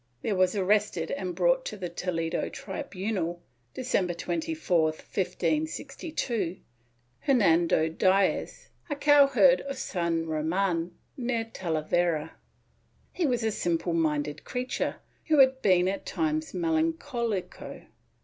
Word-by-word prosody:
There 210 - 0
was 185 +1 +2
arrested 200 -4 +1
and 185 -2 -3
brought - - +3
to - - -5
the 185 -2 -4
Toledo 170 -1 -2
tribunal, 190 - -4 0.4
December 190 -9 0
24, 315 - 0
1562, 180 - -2 0.6
Hernando 170 - +3
Diaz, 185 +4 +1 0.2
a 290 - -1
cowherd 280 -2 +5
of 275 -1 -6
San 170 -8 -1
Roman, 165 +2 -1 0.2
near 240 -4 -1
Talavera. 165 -4 -1 0.8
He 350 -4 0
was 245 -3 0
a 220 - +1
simple 170 -3 -1
minded 150 -2 0
creature, 250 0 -2 0.3
who 310 -2 +3
had 265 -1 +5
been 185 -2 +4
at 195 +1 -3
times 315 -1 -1
melancoUco. 315 - -2
190 Hz, 110 wpm, -28 LUFS, 170-265 Hz, 0.8 s, cowherd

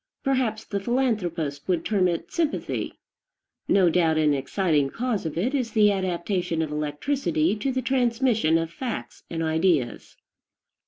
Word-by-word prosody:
Perhaps 255 -6 0
the 200 - -2
philanthropist 185 - -1
would 175 -3 0
term 195 -4 +2
it 170 -2 -3
sympathy. 325 -3 -2 0.7
No 190 -3 +4
doubt 165 -2 +3
an 150 -2 +3
exciting 145 +1 +1
cause 225 - -2
of 160 - -6
it 235 +11 0
is 255 -5 -1
the 210 -2 +5
adaptation 180 -2 -1
of 155 - -4
electricity 155 - 0
to 265 +6 -1
the 260 0 -2
transmission 240 -8 +2
of 165 0 -2
facts 255 -3 -5
and 165 -1 -2
ideas. 160 -5 0
185 Hz, 145 wpm, -25 LUFS, 160-235 Hz, 0.7 s, the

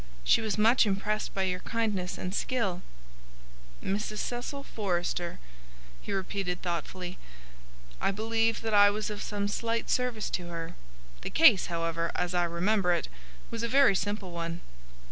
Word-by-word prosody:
She - - +4
was 220 -2 -1
much 225 +2 +5
impressed 210 +2 -1
by 195 - +1
your 180 -1 0
kindness 210 -5 -2
and 185 - -4
skill." 200 -6 -1 1.0
"Mrs. 210 +2 -2
Cecil 245 +5 -3
Forrester," 175 -6 -2 0.6
he - - -6
repeated 190 -2 -2
thoughtfully. 180 +1 -4 0.8
"I - - +2
believe 225 +2 +1
that 225 -1 -2
I 205 0 +8
was 210 +1 -2
of 205 0 -5
some 205 -1 -2
slight 230 +2 -1
service 250 -4 0
to 175 -1 -2
her. 165 -1 -5 0.5
The - - -4
case, 250 - +6
however, 165 -1 -1
as 180 0 -1
I 175 -1 +3
remember 180 +2 +2
it, 170 - -2 0.4
was 230 -1 -3
a 235 - 0
very 270 -1 +5
simple 205 -1 -2
one." 170 0 -4
200 Hz, 150 wpm, -29 LUFS, 180-225 Hz, 1.0 s, I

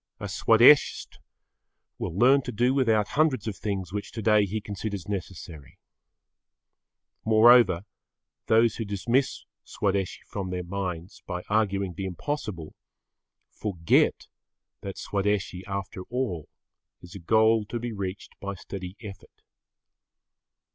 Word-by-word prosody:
A 100 - -5
Swadeshist 115 +7 +4 0.8
will 90 -1 -4
learn 135 +5 +5
to 125 - -6
do 120 +3 +2
without 110 -6 +2
hundreds 145 -8 +1
of 105 - -3
things 95 -3 -4
which 105 -1 -4
today 105 -2 +3
he 110 +3 -3
considers 100 -2 -6
necessary. 90 -7 -7 1.5
Moreover, 110 -4 +5 0.6
those 115 +1 +3
who 115 - -2
dismiss 115 +6 -1 0.2
Swadeshi 100 -2 -2
from 95 -2 -5
their 90 0 -3
minds 90 0 -5
by 90 -1 -4
arguing 100 -3 +1
the 95 +3 -5
impossible, 95 - -5 0.8
forget 90 -6 +1 0.5
that 100 -1 -7
Swadeshi, 100 -2 -2
after 100 -1 -5
all, 115 - -3 0.5
is 90 -1 -12
a 100 - -8
goal 110 +4 +3
to 120 - -4
be 120 0 -4
reached 100 -1 -6
by 100 0 -5
steady 95 +1 -8
effort. 100 -4 -12
100 Hz, 120 wpm, -26 LUFS, 95-110 Hz, 1.5 s, learn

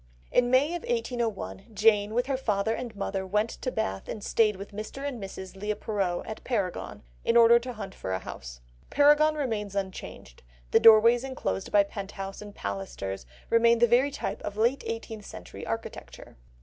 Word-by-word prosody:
In 245 0 +3
May 260 +4 +4
of 345 0 -3
1801, 240 - -3
Jane, 210 0 +3
with 245 +1 +2
her 270 0 -1
father 220 -4 0
and 235 -1 -5
mother, 195 -1 -2
went 210 +4 0
to 255 - -4
Bath 95 - -3
and 215 - -5
stayed 215 -1 +2
with 200 +2 -9
Mr. 215 +7 -6
and 250 -6 -5
Mrs. 190 -1 -8
Leigh 210 +2 -2
Perrot 195 -6 -2
at 220 - -7
Paragon, 200 - -3 0.2
in 235 - +3
order 235 0 +7
to 250 +1 -6
hunt 200 -4 -7
for 95 - -6
a 95 - +1
house. - - -9 0.3
Paragon 295 +2 +5
remains 220 -8 -2
unchanged, 190 - -6 0.3
the - - +6
doorways 230 +2 +7
enclosed 260 - -3
by 205 -1 +6
pent 200 0 -7
house 195 0 -6
and 205 -1 -10
pilasters 95 -5 -5 0.2
remain 235 0 +5
the 240 - +5
very 245 +4 +4
type - - -4
of 205 - -6
late 235 +5 +2
eighteenth 225 -2 -5
century - - -9
architecture. - - -6
215 Hz, 180 wpm, -28 LUFS, 195-245 Hz, 0.3 s, order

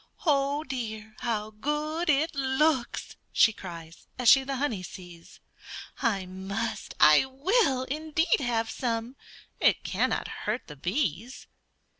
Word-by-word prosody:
"Oh, 285 -1 +2
dear! 220 -6 -5
how 215 -2 -2
good 300 +8 -2
it 305 +2 +2
looks!" 265 -1 0
she 220 - +5
cries, 170 -4 -10
As 250 -3 +4
she 270 -1 +7
the 270 0 -3
honey 255 -8 -1
sees; 175 -2 -11 0.6
"I 200 -6 +1
must, 200 +4 -4
I 150 - +7
will, 275 - +2
indeed, 310 +4 0
have 230 -4 -1
some; 235 0 -3 0.4
It - - +3
cannot - - 0
hurt 215 +4 -4
the 150 - -10
bees." 195 - -2
245 Hz, 125 wpm, -28 LUFS, 210-280 Hz, 0.6 s, she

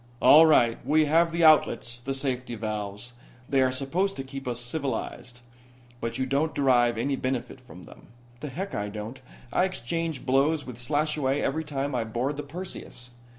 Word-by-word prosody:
"All 160 +2 +8
right. 120 -7 +3
We 155 +4 +3
have 165 +3 +3
the 170 0 0
outlets, 120 -6 +4
the 135 +3 -4
safety 130 -3 -2
valves. 105 +1 -5 0.3
They 135 -1 +2
are 130 0 +3
supposed 155 +10 -1
to 135 - -5
keep 135 0 -8
us 120 -1 -2
civilized. 125 -2 -4 0.6
But 115 +1 -3
you 130 - 0
don't 140 +4 0
derive 120 -4 +3
any 135 +4 0
benefit 130 0 -3
from 105 -8 -13
them." - - -15 0.3
"The 150 - -6
heck 190 +9 -5
I 105 0 -2
don't. 110 +5 -7 0.3
I 180 - +3
exchange 165 -3 -3
blows 140 +3 +2
with 125 -2 -9
Slashaway 145 0 0
every 155 +4 -1
time 145 -2 -3
I 120 -2 0
board 120 +6 -2
the - - -2
Perseus. 145 -5 -8
135 Hz, 175 wpm, -27 LUFS, 120-150 Hz, 0.6 s, All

